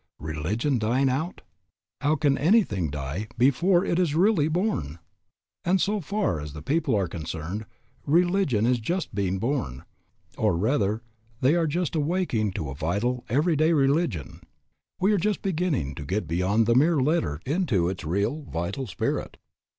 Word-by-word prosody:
Religion 95 - -1
dying 125 +5 +2
out? 155 +7 -2 0.6
How 150 +1 +2
can 145 -3 +2
anything 140 - +2
die 75 +8 -4
before 170 +9 +3
it 170 - 0
is 165 -5 +1
really 180 -3 +3
born? 160 - -1 0.7
And 185 +2 +2
so 205 +3 +1
far 195 - -1
as 75 -1 -7
the 75 -1 -8
people 140 - +1
are 100 -3 +1
concerned, 85 +5 -5 0.4
religion 170 - +2
is 125 0 +2
just 175 +10 -2
being 95 -1 0
born, 115 - -2 0.6
or 85 - +2
rather 110 +1 0 0.4
they 130 +4 +4
are 170 -1 +2
just 170 +2 -1
awaking 150 - 0
to 75 -6 -4
a - - -5
vital, 100 - -1
every 155 +7 +2
day 155 +3 +3
religion. 140 - 0 0.6
We 195 +3 +3
are 205 - +2
just 210 +3 -1
beginning 160 - -1
to - - -7
get 90 +4 -2
beyond 90 +7 +1
the 115 - +3
mere 150 +5 +4
letter 130 - +1
into 135 - +1
its 90 0 -4
real, 100 - -1
vital 95 +11 -3
spirit. - - -3
130 Hz, 160 wpm, -26 LUFS, -, 0.7 s, they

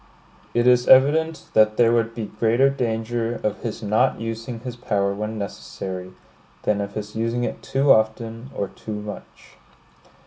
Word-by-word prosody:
It 120 0 +3
is 125 -1 +4
evident 155 +5 +5
that 110 0 +4
there 115 -1 +5
would 115 -1 +1
be 115 -2 -3
greater 115 +6 +2
danger 115 -2 -2
of 105 -1 -2
his 115 0 -5
not 105 +1 +2
using 115 +1 -5
his 125 -1 -6
power 100 -5 0
when 105 +2 -4
necessary, 95 -2 -6 0.5
than 105 -1 +1
of 100 0 -5
his 105 0 -6
using 115 +2 -1
it - - -3
too 135 +1 +2
often, 115 +2 +1
or 100 - -2
too 105 -1 -7
much. 105 0 -10
115 Hz, 160 wpm, -23 LUFS, 105-120 Hz, 0.5 s, evident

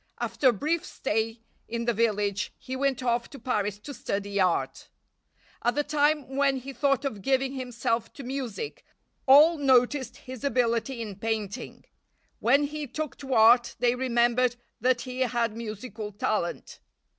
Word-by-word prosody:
After 265 - +2
a - - +5
brief 305 - -1
stay 225 -1 -2 0.3
in 235 0 -3
the 240 - +2
village 210 -3 0
he 260 - -6
went 265 -1 0
off 235 -1 0
to 280 - -10
Paris 210 -7 -1
to 285 - -8
study 200 -4 -3
art. 180 -2 0 0.7
At 240 +1 +1
the 295 - +1
time 290 -2 +1
when 275 -1 +2
he 270 +2 -7
thought 275 0 +1
of 220 -7 -3
giving 270 +3 +1
himself 240 -3 -2
to 280 - -9
music 265 - -5 0.4
all 300 +5 +7
noticed 260 -2 +2
his 260 0 -10
ability 245 -2 0
in 205 -4 -7
painting. 220 +1 -4 0.5
When 275 +5 +4
he 295 0 -4
took 305 +3 -4
to 270 -2 -3
art 235 +2 +6
they 240 0 +2
remembered 245 -1 +2 0.2
that 250 +1 +2
he 255 0 -6
had 235 -3 0
musical 220 -1 -6
talent. 200 -3 -2
245 Hz, 155 wpm, -27 LUFS, 225-270 Hz, 0.7 s, all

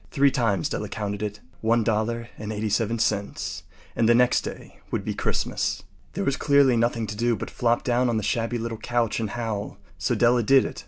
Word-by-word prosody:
Three 140 -1 +3
times 115 -9 +1
Della - - -4
counted 100 -1 -4
it. 105 0 -4 0.2
One 115 +1 +3
dollar 115 +2 -1
and 105 0 -5
eighty 110 0 -2
seven 115 +2 +1
cents. 105 -3 -1 0.3
And 115 0 +3
the 120 - +6
next 125 +1 +4
day - - -9
would - - -2
be - - -1
Christmas. - - -1 0.3
There - - -2
was 140 0 0
clearly 140 -3 +4
nothing 115 0 +1
to 105 0 -5
do 120 +2 +1
but - - -6
flop 120 -1 +1
down 125 -1 +2
on 115 - +1
the 110 - -1
shabby 115 +2 0
little 115 -1 -4
couch 120 -2 0
and 110 -2 -2
howl. 110 -3 -4 0.2
So - - 0
Della 120 0 +4
did 135 +4 +5
it. - - -6
115 Hz, 210 wpm, -25 LUFS, 110-120 Hz, 0.3 s, the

